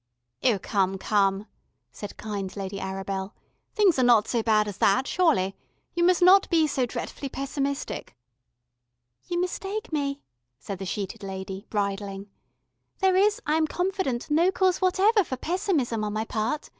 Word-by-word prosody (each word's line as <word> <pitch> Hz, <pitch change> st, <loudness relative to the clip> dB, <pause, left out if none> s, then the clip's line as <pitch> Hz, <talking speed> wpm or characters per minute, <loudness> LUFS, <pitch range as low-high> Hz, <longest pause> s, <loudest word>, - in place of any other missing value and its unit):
"Oh, 235 Hz, -5 st, +3 dB
come, 195 Hz, 0 st, 0 dB
come," 195 Hz, 0 st, +1 dB, 0.5 s
said 205 Hz, -, -8 dB
kind 200 Hz, -3 st, -5 dB
Lady 195 Hz, 0 st, -4 dB
Arabel. 195 Hz, +1 st, -4 dB, 0.4 s
"Things 395 Hz, -, +4 dB
are -, -, +4 dB
not 235 Hz, -3 st, +5 dB
so 235 Hz, -, 0 dB
bad 215 Hz, -1 st, +2 dB
as 205 Hz, -1 st, -6 dB
that, 255 Hz, +7 st, +3 dB
surely. 275 Hz, -, +2 dB, 0.4 s
You 345 Hz, -, 0 dB
must 360 Hz, 0 st, +4 dB
not 380 Hz, +2 st, +6 dB
be 325 Hz, -3 st, +4 dB
so 270 Hz, -4 st, 0 dB
dretfully 275 Hz, +3 st, -5 dB
pessimistic." 275 Hz, -, -4 dB, 1.1 s
"You 345 Hz, -1 st, -1 dB
mistake 390 Hz, +3 st, -3 dB
me," 280 Hz, -1 st, -2 dB, 0.3 s
said 185 Hz, +7 st, -7 dB
the 195 Hz, -, -5 dB
sheeted 200 Hz, +3 st, -4 dB
lady, 190 Hz, +1 st, -6 dB
bridling. 200 Hz, -1 st, -3 dB, 0.7 s
"There 380 Hz, -1 st, +3 dB
is, 420 Hz, +5 st, +3 dB
I 305 Hz, -, +2 dB
am 315 Hz, -1 st, +2 dB
confident, 355 Hz, -9 st, -2 dB
no 335 Hz, +5 st, +4 dB
cause 375 Hz, -1 st, +1 dB
whatever 390 Hz, +3 st, +4 dB
for 260 Hz, -6 st, -5 dB
pessimism 300 Hz, -, -1 dB
on 210 Hz, -1 st, -2 dB
my 215 Hz, +1 st, -1 dB
part. 225 Hz, +7 st, -2 dB
245 Hz, 155 wpm, -26 LUFS, -, 1.1 s, not